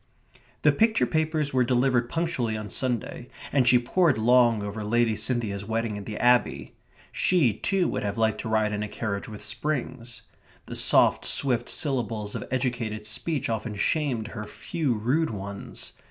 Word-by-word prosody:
The -, -, +6 dB
picture 225 Hz, 0 st, +2 dB
papers 155 Hz, -2 st, -1 dB
were 130 Hz, -1 st, +3 dB
delivered 125 Hz, -1 st, +1 dB
punctually 145 Hz, -10 st, -1 dB
on 105 Hz, -1 st, -7 dB
Sunday, 125 Hz, -1 st, -3 dB, 0.2 s
and 135 Hz, -3 st, +2 dB
she 125 Hz, +1 st, +7 dB
pored 160 Hz, +5 st, +2 dB
long 120 Hz, -1 st, +4 dB
over 105 Hz, +1 st, -5 dB
Lady 115 Hz, +1 st, +2 dB
Cynthia's 110 Hz, -5 st, -1 dB
wedding 110 Hz, 0 st, -2 dB
at 100 Hz, -1 st, -7 dB
the 105 Hz, -, -5 dB
Abbey. 125 Hz, 0 st, +2 dB, 0.4 s
She, 160 Hz, -, +2 dB
too, 190 Hz, -, 0 dB
would -, -, -2 dB
have 100 Hz, 0 st, -3 dB
liked 110 Hz, -1 st, +1 dB
to -, -, -5 dB
ride 110 Hz, -1 st, +1 dB
in 105 Hz, -, -2 dB
a 105 Hz, -, -2 dB
carriage 100 Hz, -1 st, -4 dB
with 105 Hz, -1 st, -9 dB
springs. 120 Hz, -2 st, -3 dB, 0.4 s
The -, -, -8 dB
soft, -, -, +5 dB
swift 125 Hz, -4 st, 0 dB
syllables 115 Hz, -8 st, -1 dB
of -, -, -4 dB
educated 120 Hz, -4 st, -2 dB
speech 135 Hz, +7 st, -2 dB
often 110 Hz, -1 st, -3 dB
shamed 120 Hz, -1 st, -1 dB
her 105 Hz, -1 st, -6 dB
few 140 Hz, +2 st, -2 dB
rude 130 Hz, +10 st, 0 dB
ones. 100 Hz, -1 st, -7 dB
120 Hz, 165 wpm, -26 LUFS, 110-130 Hz, 0.4 s, she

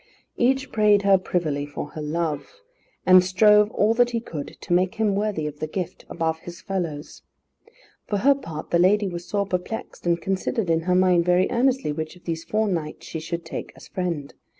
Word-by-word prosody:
Each 265 Hz, +2 st, +1 dB
prayed 210 Hz, -2 st, +4 dB
her 195 Hz, -1 st, +5 dB
privily 155 Hz, -6 st, -1 dB
for 145 Hz, 0 st, -6 dB
her 155 Hz, -, -7 dB
love, 155 Hz, -, -3 dB, 0.5 s
and 185 Hz, 0 st, +8 dB
strove 210 Hz, +3 st, +5 dB
all 215 Hz, +1 st, +2 dB
that 245 Hz, +1 st, +3 dB
he 235 Hz, -1 st, -1 dB
could 160 Hz, -10 st, -7 dB
to -, -, -2 dB
make 180 Hz, +1 st, +2 dB
him 220 Hz, -2 st, +1 dB
worthy 200 Hz, -6 st, -1 dB
of 150 Hz, -1 st, -6 dB
the 155 Hz, -, -2 dB
gift, 180 Hz, +2 st, -5 dB
above 160 Hz, -1 st, -1 dB
his 175 Hz, +1 st, -10 dB
fellows. 170 Hz, -7 st, -4 dB, 0.9 s
For 205 Hz, -, 0 dB
her 275 Hz, +8 st, +5 dB
part 165 Hz, -, -8 dB
the 170 Hz, -, +3 dB
lady 200 Hz, +3 st, +4 dB
was 175 Hz, -1 st, -6 dB
sore 200 Hz, -1 st, 0 dB
perplexed, 185 Hz, 0 st, -4 dB
and 170 Hz, 0 st, +2 dB
considered 195 Hz, +2 st, -1 dB
in 165 Hz, -, +3 dB
her 180 Hz, -, +4 dB
mind 180 Hz, -2 st, +4 dB
very 180 Hz, +1 st, +3 dB
earnestly, 250 Hz, -, +1 dB
which 155 Hz, +3 st, -5 dB
of 180 Hz, -, -19 dB
these 165 Hz, -1 st, -3 dB
four 215 Hz, +3 st, 0 dB
knights 165 Hz, -6 st, -3 dB
she 160 Hz, -, -5 dB
should 170 Hz, +1 st, -5 dB
take -, -, -6 dB
as -, -, -14 dB
friend. 170 Hz, -6 st, -3 dB
180 Hz, 195 wpm, -24 LUFS, 165-210 Hz, 0.9 s, and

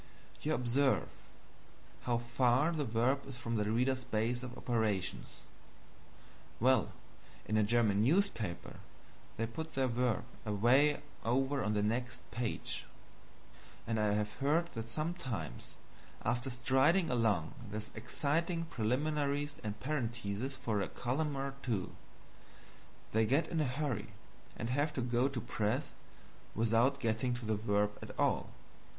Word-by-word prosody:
You 155 Hz, +1 st, +1 dB
observe 130 Hz, +3 st, +2 dB, 1.0 s
how 120 Hz, -1 st, +2 dB
far 120 Hz, +5 st, +2 dB
that 155 Hz, -4 st, -1 dB
verb 120 Hz, +4 st, +1 dB
is 135 Hz, -3 st, -7 dB
from 115 Hz, -2 st, -2 dB
the 105 Hz, 0 st, +1 dB
reader's 130 Hz, +3 st, +1 dB
base 115 Hz, +3 st, 0 dB
of 125 Hz, -1 st, -7 dB
operations; 100 Hz, -, -1 dB, 1.2 s
well, 130 Hz, -1 st, +4 dB, 0.5 s
in 110 Hz, -, -1 dB
a 110 Hz, -, +5 dB
German 105 Hz, -2 st, +3 dB
newspaper 115 Hz, -, +1 dB, 0.6 s
they 115 Hz, -, +1 dB
put 160 Hz, +8 st, -6 dB
their 135 Hz, -1 st, +3 dB
verb 125 Hz, -2 st, +1 dB, 0.2 s
away 130 Hz, +8 st, +4 dB, 0.2 s
over 135 Hz, +3 st, +1 dB
on 105 Hz, +1 st, 0 dB
the 105 Hz, -, +2 dB
next 120 Hz, +3 st, -1 dB
page; 120 Hz, -1 st, -3 dB, 1.0 s
and 110 Hz, -1 st, 0 dB
I 105 Hz, -1 st, +3 dB
have 105 Hz, 0 st, 0 dB
heard 155 Hz, +5 st, +2 dB
that 115 Hz, -1 st, -5 dB
sometimes 125 Hz, -, -3 dB, 0.6 s
after 125 Hz, +2 st, 0 dB
stringing 135 Hz, +8 st, +3 dB
along 110 Hz, -9 st, +2 dB, 0.2 s
the 105 Hz, +1 st, -4 dB
exciting 165 Hz, +8 st, 0 dB
preliminaries 145 Hz, +3 st, 0 dB
and 105 Hz, 0 st, -4 dB
parentheses 125 Hz, -3 st, -2 dB
for 110 Hz, -6 st, -1 dB
a 95 Hz, -, -1 dB
column 140 Hz, +4 st, -1 dB
or 135 Hz, 0 st, -2 dB
two, 110 Hz, -8 st, -1 dB, 1.2 s
they 110 Hz, 0 st, +3 dB
get 140 Hz, +7 st, +2 dB
in 165 Hz, -2 st, +1 dB
a -, -, +2 dB
hurry 130 Hz, -5 st, -1 dB, 0.5 s
and 115 Hz, +2 st, -2 dB
have 145 Hz, +3 st, +1 dB
to 130 Hz, -, -1 dB
go 120 Hz, +1 st, +2 dB
to 135 Hz, -3 st, -3 dB
press 115 Hz, +5 st, -1 dB, 0.6 s
without 115 Hz, +5 st, +3 dB
getting 120 Hz, +1 st, 0 dB
to 120 Hz, -1 st, -6 dB
the 110 Hz, 0 st, +1 dB
verb 105 Hz, 0 st, +1 dB
at -, -, -9 dB
all. -, -, +2 dB
120 Hz, 135 wpm, -34 LUFS, 110-140 Hz, 1.2 s, a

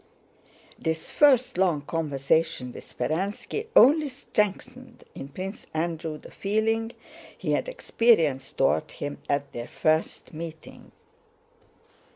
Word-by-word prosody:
This 160 Hz, -1 st, -2 dB
first 260 Hz, -9 st, +4 dB
long 175 Hz, -6 st, +3 dB
conversation 150 Hz, -3 st, 0 dB
with -, -, -9 dB
Speránski 200 Hz, -, -2 dB
only 295 Hz, +5 st, +7 dB
strengthened 250 Hz, 0 st, -3 dB
in 135 Hz, -, -7 dB
Prince 190 Hz, +7 st, -7 dB
Andrew 160 Hz, -1 st, -2 dB
the -, -, -14 dB
feeling 225 Hz, +3 st, 0 dB, 0.4 s
he -, -, -2 dB
had -, -, 0 dB
experienced 225 Hz, -, +2 dB
toward 150 Hz, +3 st, +2 dB
him 145 Hz, 0 st, -6 dB
at 140 Hz, 0 st, 0 dB
their 120 Hz, 0 st, -5 dB
first 155 Hz, +1 st, 0 dB
meeting. 160 Hz, 0 st, -9 dB
170 Hz, 110 wpm, -26 LUFS, 155-230 Hz, 0.4 s, only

